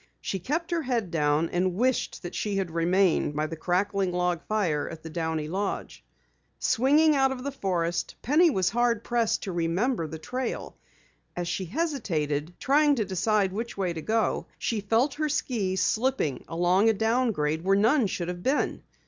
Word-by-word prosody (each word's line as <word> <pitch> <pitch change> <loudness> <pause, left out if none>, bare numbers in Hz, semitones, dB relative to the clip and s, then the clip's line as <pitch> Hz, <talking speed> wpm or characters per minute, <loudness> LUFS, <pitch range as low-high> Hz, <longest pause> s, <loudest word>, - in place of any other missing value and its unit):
She 195 - -3
kept 320 - -2
her 340 -1 +1
head 240 - -1
down 150 0 +1
and 180 0 0
wished 255 +1 0
that 175 - -6
she 205 -2 -2
had 190 -4 -1
remained 170 -2 +2
by 150 +1 0
the 160 +1 -5
crackling 185 +3 0
log 180 -1 0
fire 180 -9 0
at 165 -1 -9
the 160 - -8
Downey 160 -2 -2
lodge. 195 +5 -4 0.5
Swinging 295 +6 +3
out 270 -1 +3
of 255 -1 -5
the 280 - -3
forest, 175 -9 -2
Penny 315 +7 +5
was 190 - +1
hard 235 -1 +1
pressed 235 -2 0
to 195 - -3
remember 175 +4 0
the 160 - -7
trail. 250 +10 -4 0.6
As 175 -1 -3
she 185 +2 -2
hesitated, 175 - -2
trying 290 +1 +4
to 220 -5 0
decide 195 +1 +1
which 230 +2 -4
way 185 -3 -1
to 160 - -5
go, 220 +5 0
she 225 -3 -1
felt 230 +7 +2
her 305 0 -1
skis 205 -10 0
slipping 220 - 0
along 180 +5 +3
a - - +4
downgrade 220 -9 0
where 195 +1 +3
none 230 +3 +3
should 175 -2 -3
have 175 0 -5
been. 270 +9 0
195 Hz, 175 wpm, -27 LUFS, 170-245 Hz, 0.6 s, Penny